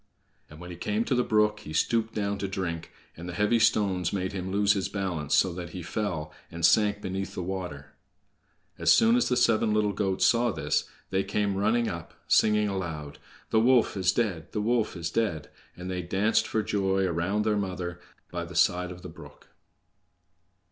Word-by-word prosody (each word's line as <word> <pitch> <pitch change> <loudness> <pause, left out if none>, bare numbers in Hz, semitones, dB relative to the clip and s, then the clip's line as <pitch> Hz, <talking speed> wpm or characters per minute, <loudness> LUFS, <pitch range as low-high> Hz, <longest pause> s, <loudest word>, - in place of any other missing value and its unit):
And 75 - -13
when 90 +1 -9
he 85 - -8
came 105 +5 -1
to - - 0
the 125 0 +2
brook 105 -1 +2
he 90 -7 -9
stooped 115 +6 0
down 100 -1 -1
to 100 - -2
drink, 85 -4 -4 0.2
and 85 +2 -8
the 85 - -6
heavy 105 +5 +2
stones 95 -6 +2
made 95 -1 -2
him 95 -1 -4
lose 100 +1 +3
his 95 -2 -2
balance 90 -8 -1
so 95 -2 +3
that 85 -2 -7
he 90 - -6
fell, 85 -5 -3 0.2
and 85 0 -1
sank 105 +3 +3
beneath 95 +1 -4
the 90 - -3
water. 90 -6 -6 0.9
As - - +4
soon 230 +1 +5
as 245 - +2
the 125 - +1
seven 115 -3 +3
little 105 -1 +1
goats 95 -1 0
saw 120 0 +3
this, 75 -5 -1 0.2
they 95 0 +1
came 100 -1 -1
running 110 +4 +1
up, 85 0 -6
singing 105 -1 +4
aloud, 80 -7 -5 0.3
"The 110 - +4
wolf 120 +1 +4
is 95 -2 +2
dead! 95 -9 -2
the 105 - -1
wolf 115 -3 0
is 85 -1 -4
dead!" 100 -10 -1 0.3
and 90 +1 -7
they 90 -1 -2
danced 105 +5 +1
for 110 - -1
joy 95 -2 0
around 95 +5 0
their 110 -1 +2
mother 90 -3 -4 0.3
by 85 -1 -3
the 90 0 -11
side 90 +1 +2
of 90 0 -10
the - - -6
brook. 80 - -14
95 Hz, 195 wpm, -27 LUFS, 90-105 Hz, 0.9 s, soon